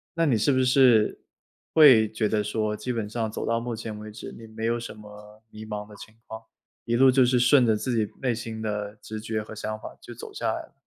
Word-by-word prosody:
那 165 - +2
你 125 -7 +2
是 110 +7 +2
不 130 - +2
是， 125 -4 +4 0.5
会 130 -9 +7
觉 110 -1 0
得 105 0 0
说， 105 0 -2
基 125 - -4
本 115 -4 -3
上 110 -1 -3
走 - - -4
到 115 0 0
目 120 0 -4
前 110 -1 -7
为 105 0 -9
止， 105 - -9
你 115 - -11
没 110 +1 -6
有 115 +1 +1
什 120 - -7
么 105 0 -14
迷 110 0 -10
茫 105 -1 -6
的 105 - -14
情 110 +1 -13
况。 110 0 -8 0.4
一 120 - -1
路 130 +1 +6
就 130 0 +4
是 125 0 +2
顺 125 +1 +5
着 110 - +3
自 120 +2 -2
己 110 -2 0
内 125 -3 0
心 115 -1 -6
的 105 -1 -4
直 110 0 -7
觉 110 -1 -3
和 110 - -10
想 110 0 -5
法 - - -10
就 - - -10
走 - - -10
下 - - -3
来 - - -4
了？ - - -19
110 Hz, 270 characters per minute, -25 LUFS, 105-120 Hz, 0.5 s, 会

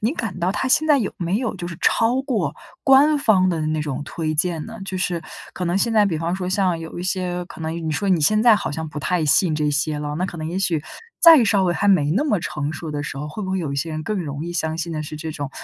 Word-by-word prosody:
你 225 +6 +1
感 225 - -4
到 180 +2 0
它 260 +6 -1
现 315 +4 +3
在 295 -2 +5
有 215 - -2
没 180 +3 -1
有 245 -3 -2
就 175 - -5
是 170 - -7
超 235 +3 +2
过 260 -6 -1 0.3
官 290 +2 +6
方 190 -8 +3
的 165 -3 -1
那 155 0 -1
种 145 -2 -4
推 155 0 -3
荐 165 0 0
呢？ 225 0 -9
就 190 -1 -4
是 180 -2 -1 0.3
可 180 - -4
能 175 +1 0
现 225 +3 +1
在 210 -2 +4
比 165 -5 -1
方 165 +3 -2
说 180 -1 -4
像 185 -3 +1
有 165 +1 -8
一 - - -4
些 180 -1 -2
可 - - -12
能 160 +1 -3
你 165 -2 -3
说 195 +7 -1
你 180 -4 +3
现 215 +8 +3
在 230 -1 +6
好 - - -2
像 160 +2 -4
不 150 0 -6
太 175 +1 0
信 155 +3 +3
这 150 -1 0
些 150 +1 0
了， 150 0 -4
那 180 - -1
可 175 - -8
能 155 0 -4
也 180 - -3
许， 170 -5 0 0.4
再 325 -8 +8
稍 200 -2 +2
微 175 -1 +1
还 205 - 0
没 150 -7 +4
那 275 - +1
么 210 -10 +1
成 150 -1 -3
熟 155 +1 -6
的 145 -1 -3
时 140 - -6
候， 150 +1 -5
会 210 +8 -6
不 190 - -4
会 190 - 0
有 155 -6 -3
一 - - -3
些 160 +4 -2
人， 155 0 -4
更 210 +4 -2
容 145 -3 -4
易 175 - -5
相 160 -2 -2
信 170 0 -3
的 155 - -3
是 155 0 -7
这 160 +1 -5
种 145 -3 -5
175 Hz, 315 characters per minute, -21 LUFS, 155-205 Hz, 0.4 s, 再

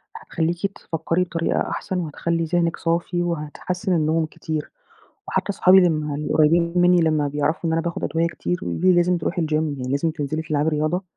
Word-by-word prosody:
هتخليكِ 175 +4 -2
تفكّري 165 +2 -1
بطريقة 170 -2 -1
أحسن 190 - -3
وهتخلّي 165 +1 -2
ذهنِك 170 0 0
صافي 170 +1 -1
وهتحسّن 175 +3 -3
النوم 160 0 +1
كتير". 155 0 -5 0.6
وحتّى - - -2
أصحابي 190 -1 +5
ال 180 -2 +6 0.4
القريبين 170 +2 +3
مِنّي 180 0 +5
لمّا 155 -2 +2
بيعرفوا 145 +3 -1
إن 160 - 0
أنا 165 - +1
باخد 170 +3 -4
أدوية 165 +1 +1
كتير، 175 +1 -3
ويقولوا - - -4
لي: 185 0 +5
"لازم 175 0 +3
تروحي 170 +1 -2
الgym 155 -1 -2
يعني 145 -5 -1
لازم 150 +4 +1
تنزلي 155 0 -3
تلعبي 155 -1 0
رياضة". 155 +4 -1
165 Hz, 170 wpm, -22 LUFS, 155-175 Hz, 0.6 s, ال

